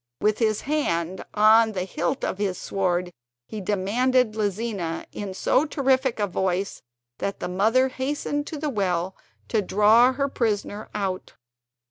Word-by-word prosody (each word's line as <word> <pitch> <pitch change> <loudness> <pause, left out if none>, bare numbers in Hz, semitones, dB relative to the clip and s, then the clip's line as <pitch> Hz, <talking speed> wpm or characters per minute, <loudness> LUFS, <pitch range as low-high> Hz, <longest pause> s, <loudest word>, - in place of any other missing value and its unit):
With 210 0 +1
his 215 -2 +1
hand 185 - -1
on 220 +1 +6
the 185 -2 -2
hilt 175 -2 -2
of 190 - -3
his 195 -3 -1
sword 180 -2 -1 0.3
he 215 - -6
demanded 220 +5 +1
Lizina 205 -5 -2
in 200 -2 -6
so 260 - +2
terrific 265 -4 +1
a 205 - +2
voice 190 0 -2 0.4
that 200 - -3
the - - -3
mother 220 +8 +2
hastened 290 +2 -2
to 310 - -5
the 295 0 -2
well 185 -4 -1 0.3
to 220 - +2
draw 215 +6 +5
her 275 +1 0
prisoner 215 -5 -2
out. 190 -3 -3
210 Hz, 145 wpm, -25 LUFS, 190-255 Hz, 0.4 s, on